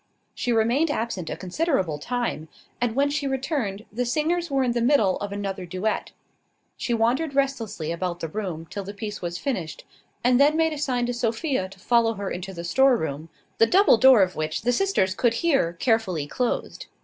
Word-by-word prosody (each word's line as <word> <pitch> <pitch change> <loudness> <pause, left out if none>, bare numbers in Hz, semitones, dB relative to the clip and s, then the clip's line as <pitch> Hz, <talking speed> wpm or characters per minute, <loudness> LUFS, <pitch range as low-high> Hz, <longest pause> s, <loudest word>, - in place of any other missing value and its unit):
She 245 - -2
remained 235 +8 +2
absent 225 - -3
a - - -4
considerable 185 - -1
time; 235 -7 -3 0.3
and 240 -2 0
when 280 +1 +2
she 290 -1 -1
returned, 265 - -2
the 245 +3 -1
singers 320 +7 0
were 270 -1 +1
in 250 - +1
the 235 0 -1
middle 230 -7 +3
of 205 0 -5
another 195 -2 -4
duet. 185 +5 -2 0.7
She 250 - -4
wandered 245 +6 +1
restlessly 230 - -1
about 175 0 -3
the 165 - -3
room 170 -3 -5
till 200 - -5
the 200 +2 -8
piece 210 0 -6
was 175 -1 -3
finished, 185 - -4 0.4
and 250 +1 +4
then 295 +2 +5
made 320 -1 +2
a 300 - -6
sign 250 -4 0
to 245 - -2
Sophia 235 - -1
to 195 - -14
follow 230 +2 +2
her 200 -1 -4
into 185 +2 -5
the 170 -2 -7
storeroom, 170 - +1 0.3
the 225 - +6
double 380 - +5
door 260 -5 +7
of 185 0 -2
which 155 0 -3
the 245 - +2
sisters 245 - +1
could 230 +3 +1
hear 270 - +1
carefully 185 - 0
closed. 245 - -3
230 Hz, 190 wpm, -24 LUFS, 185-270 Hz, 0.7 s, door